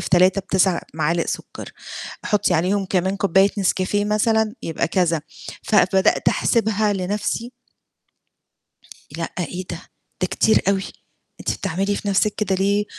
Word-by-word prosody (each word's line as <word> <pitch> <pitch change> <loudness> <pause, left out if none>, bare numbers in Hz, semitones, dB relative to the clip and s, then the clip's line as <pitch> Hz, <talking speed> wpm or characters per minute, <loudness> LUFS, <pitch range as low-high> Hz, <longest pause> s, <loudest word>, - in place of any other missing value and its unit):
في - - -4
3 185 +2 +4
ب9 190 -2 +1
معالق 165 +2 0
سُكّر، - - -6 0.5
حُطّي 205 -4 +1
عليهم 190 +5 +1
كمان 190 +1 0
كوباية 195 0 +3
نسكافيه 195 +1 +1
مثلًا 215 +1 +1
يبقى 160 - -2
كذا، 170 -3 +1 0.4
فبدأت 190 -2 +3
أحسبها 215 -2 +1
لنَفْسي 205 +5 -2 1.7
لأ، 165 0 -3
إيه 180 +1 -4
ده، - - -5 0.4
ده - - +2
كتير 220 - +3
أوي، 195 -1 +2 0.6
أنتِ - - -2
بتعملي 195 +3 -1
في 205 - -4
نَفْسِك 200 +1 +2
كده 200 -2 -1
ليه؟! 200 +2 +1
195 Hz, 130 wpm, -21 LUFS, 180-205 Hz, 1.7 s, 3